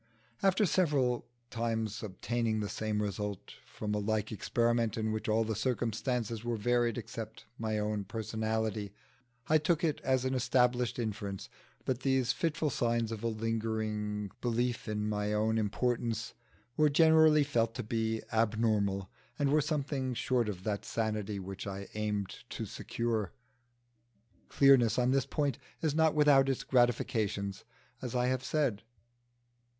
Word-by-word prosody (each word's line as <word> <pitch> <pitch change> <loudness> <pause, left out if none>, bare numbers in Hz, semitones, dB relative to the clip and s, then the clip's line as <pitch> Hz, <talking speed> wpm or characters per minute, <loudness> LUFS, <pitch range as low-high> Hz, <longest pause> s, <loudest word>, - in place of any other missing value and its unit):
After 195 +2 +4
several 145 -9 +1 0.2
times 115 -2 -2
obtaining 110 +2 -1
the 105 -1 -2
same 105 -1 -1
result 105 -1 -4
from 105 -1 -4
a 105 - +1
like 110 +1 -1
experiment 115 +1 +1
in 110 0 0
which 110 0 -3
all 110 +1 +3
the 110 0 -2
circumstances 115 -1 -1
were 120 -1 -1
varied 120 +1 +1
except 110 -1 -7
my 110 -1 -1
own 105 -1 -1
personality, 110 -1 -2 0.5
I 155 0 +5
took 165 +2 +1
it 155 -3 0
as 130 -1 +1
an 130 - 0
established 125 -1 +2
inference 100 -4 -4 0.4
that 130 -2 0
these 130 -2 +2
fitful 165 -3 0
signs 115 -2 0
of 110 0 -5
a - - +1
lingering 110 -2 -2
belief 120 0 -1
in 105 -1 -1
my 105 0 -1
own 110 +1 +2
importance 115 +1 -1 0.4
were 155 -1 +4
generally 160 0 +6
felt 115 -5 0
to 125 - -3
be 110 0 -1
abnormal, 110 -3 +1 0.3
and 140 -1 +1
were 150 +1 +4
something 140 -3 -1
short 120 -1 +1
of 95 -3 -6
that 105 -1 -2
sanity 110 -2 -2
which 95 +1 -6
I 100 0 -5
aimed 105 -2 -2
to - - -4
secure. 115 -6 -2 1.2
Clearness 130 -5 +5
on 125 0 +3
this 135 -1 +2
point 145 -4 -1 0.2
is 155 -3 0
not 160 0 +3
without 145 -3 +5
its 135 - -1
gratifications, 110 -6 +1 0.4
as 125 -1 -4
I 125 0 +2
have 130 0 0
said. 135 -7 0
115 Hz, 145 wpm, -32 LUFS, 105-130 Hz, 1.2 s, generally